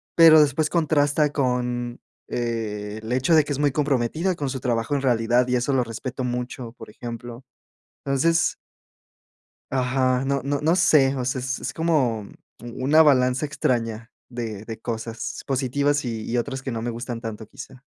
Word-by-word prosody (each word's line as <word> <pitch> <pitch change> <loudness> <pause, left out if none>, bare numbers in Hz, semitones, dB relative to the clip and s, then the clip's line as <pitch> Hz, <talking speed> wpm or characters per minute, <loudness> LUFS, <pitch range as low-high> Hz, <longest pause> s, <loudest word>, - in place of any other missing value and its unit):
pero 160 -2 +8
después 150 +1 +2
contrasta 150 -2 +2
con 125 -3 -1 0.3
el 110 -2 -4
hecho 130 +6 +2
de 155 -2 +6
que 145 - -6
es - - -3
muy 145 -1 +2
comprometida 150 +5 0
con 145 -4 -3
su 130 - -4
trabajo 120 +1 -1
en 140 - 0
realidad 120 -1 +2
y 125 - +1
eso 125 +3 0
lo 130 - +3
respeto 125 +3 -5
mucho, 125 -1 -4
por - - -12
ejemplo, 120 +2 -8 0.6
entonces 155 +5 +2 1.2
ajá, 130 0 +1
no 140 -1 0
no 140 0 -1
no 160 +4 +2
sé, 140 -6 +4
o 125 - -2
sea, 130 +2 -1
es 130 +2 -3
es - - -4
como 130 -11 0 0.3
u 120 +2 -6
una 155 +4 +5
balanza 130 -2 +4
extraña 115 -5 -2 0.2
de 110 -4 -6
de 115 -1 -6
cosas 115 0 -5
positivas 140 +2 0
y 115 -3 -4
y 120 - 0
otras 135 +2 -2
que 130 - -4
no 115 -2 -4
me 120 - -2
gustan 120 0 -5
tanto, 110 -1 -6
quizá. 130 -1 -11
125 Hz, 170 wpm, -24 LUFS, 120-140 Hz, 1.2 s, pero